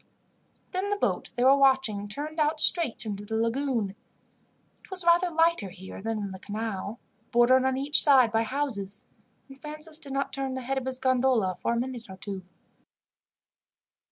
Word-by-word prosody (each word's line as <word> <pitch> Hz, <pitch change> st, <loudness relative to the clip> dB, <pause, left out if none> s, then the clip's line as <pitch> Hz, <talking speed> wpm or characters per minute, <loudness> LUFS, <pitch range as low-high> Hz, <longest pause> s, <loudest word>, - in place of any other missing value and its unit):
Then 380 Hz, +2 st, -2 dB
the 410 Hz, -, +1 dB
boat 405 Hz, -, -1 dB
they 245 Hz, -, 0 dB
were 265 Hz, +2 st, +7 dB
watching 265 Hz, -7 st, +2 dB
turned 300 Hz, +9 st, -6 dB
out 305 Hz, +1 st, +1 dB
straight 315 Hz, -9 st, +5 dB
into 205 Hz, -1 st, -5 dB
the 220 Hz, +2 st, -5 dB
lagoon. 230 Hz, -2 st, -1 dB, 0.9 s
It -, -, -19 dB
was 370 Hz, -2 st, -3 dB
rather 345 Hz, +1 st, +4 dB
lighter 325 Hz, -, +1 dB
here 190 Hz, +1 st, -10 dB
than 225 Hz, +1 st, -2 dB
in 200 Hz, -2 st, -4 dB
the 190 Hz, -, -9 dB
canal, 215 Hz, +1 st, -5 dB, 0.3 s
bordered 255 Hz, +2 st, +4 dB
on 265 Hz, 0 st, +1 dB
each 285 Hz, +2 st, +4 dB
side 260 Hz, -6 st, +6 dB
by 225 Hz, 0 st, +2 dB
houses, 225 Hz, -5 st, -3 dB, 0.4 s
and 270 Hz, -1 st, -15 dB
Francis 305 Hz, +2 st, -4 dB
did 280 Hz, -3 st, -8 dB
not 275 Hz, 0 st, -2 dB
turn 270 Hz, -1 st, -2 dB
the 260 Hz, -, -4 dB
head 265 Hz, +2 st, -2 dB
of 260 Hz, -, -8 dB
his 260 Hz, -1 st, -2 dB
gondola 255 Hz, -7 st, +1 dB
for 235 Hz, -, -2 dB
a 235 Hz, -, 0 dB
minute 245 Hz, -2 st, -5 dB
or 190 Hz, -, -10 dB
two. 195 Hz, 0 st, -6 dB
260 Hz, 180 wpm, -27 LUFS, 220-285 Hz, 0.9 s, were